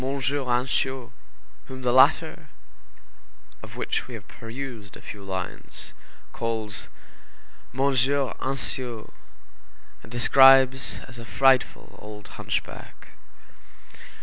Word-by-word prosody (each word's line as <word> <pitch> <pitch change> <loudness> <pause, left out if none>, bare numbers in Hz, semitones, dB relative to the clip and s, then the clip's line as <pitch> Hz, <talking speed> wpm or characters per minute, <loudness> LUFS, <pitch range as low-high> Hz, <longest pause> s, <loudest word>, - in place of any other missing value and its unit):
Ansiaux, 130 -1 -1 0.6
whom 130 0 -8
the 125 - +2
letter, 130 +1 +4 1.1
of - - -11
which - - -2
we 125 - -7
have 110 0 -11
perused 115 -4 -8
a - - -15
few 100 -1 -9
lines, 95 -2 -5 0.4
calls 110 -2 -3 0.8
M. 130 - -4
Anciot, 135 -2 0 0.9
and 110 - -14
describes 130 +1 +6
as 120 -2 -11
a - - -8
frightful 130 +4 +2
old 105 -1 -10
hunchback. - - -5
125 Hz, 95 wpm, -25 LUFS, 115-135 Hz, 1.1 s, describes